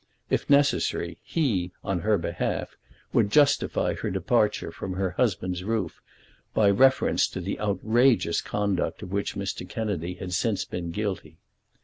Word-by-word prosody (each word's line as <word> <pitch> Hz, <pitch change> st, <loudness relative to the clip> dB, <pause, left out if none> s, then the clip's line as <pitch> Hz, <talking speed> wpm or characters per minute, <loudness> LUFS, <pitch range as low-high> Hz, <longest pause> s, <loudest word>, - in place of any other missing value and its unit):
If -, -, 0 dB
necessary 140 Hz, -, +2 dB
he, 100 Hz, -, -1 dB
on 95 Hz, -2 st, -1 dB
her 105 Hz, +3 st, +2 dB
behalf, 85 Hz, -, -3 dB, 0.4 s
would 100 Hz, -, +3 dB
justify 145 Hz, +4 st, +3 dB
her -, -, -3 dB
departure -, -, +1 dB
from 95 Hz, -, -5 dB
her 95 Hz, 0 st, -1 dB
husband's 95 Hz, -4 st, -1 dB
roof 110 Hz, -1 st, -2 dB, 0.5 s
by 105 Hz, -2 st, +5 dB
a -, -, +4 dB
reference 130 Hz, +4 st, +4 dB
to -, -, -6 dB
the 95 Hz, +2 st, -4 dB
outrageous 110 Hz, -1 st, +2 dB
conduct 100 Hz, -3 st, -1 dB
of 90 Hz, -, -8 dB
which 100 Hz, 0 st, -2 dB
Mr. -, -, -4 dB
Kennedy 90 Hz, -6 st, -3 dB
had 90 Hz, 0 st, -6 dB
since 100 Hz, +2 st, 0 dB
been 85 Hz, -1 st, -5 dB
guilty. 85 Hz, -4 st, -4 dB
100 Hz, 145 wpm, -26 LUFS, 90-110 Hz, 0.5 s, by